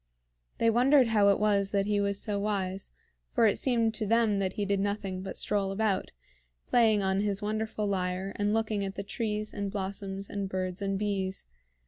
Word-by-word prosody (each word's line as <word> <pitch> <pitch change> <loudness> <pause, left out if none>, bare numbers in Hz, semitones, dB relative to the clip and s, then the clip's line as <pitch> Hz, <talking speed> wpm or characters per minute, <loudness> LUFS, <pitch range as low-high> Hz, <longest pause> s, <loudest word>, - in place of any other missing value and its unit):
They 230 - +3
wondered 255 +2 +5
how 205 -2 +4
it 200 - +3
was 200 -2 +2
that 200 -1 +1
he 205 0 +1
was 200 0 0
so 205 -2 -2
wise; 195 -2 -2 0.4
for - - +3
it 210 - +3
seemed 230 -4 +2
to 215 -1 -2
them 225 -2 +3
that 190 -1 -1
he 205 - -2
did 200 0 0
nothing 200 -2 -2
but 190 0 -5
stroll 200 -2 0
about, 200 -1 0 0.5
playing 220 -4 +3
on 190 0 +1
his 205 0 -1
wonderful 215 0 -2
lyre 190 -1 -1
and 205 0 0
looking 220 -2 0
at 195 0 -4
the 200 - -4
trees 215 0 -3
and 200 -1 -3
blossoms 195 0 -4
and 200 -1 -4
birds 185 0 -3
and 195 -1 -1
bees. 195 -2 -2
200 Hz, 190 wpm, -29 LUFS, 195-215 Hz, 0.5 s, wondered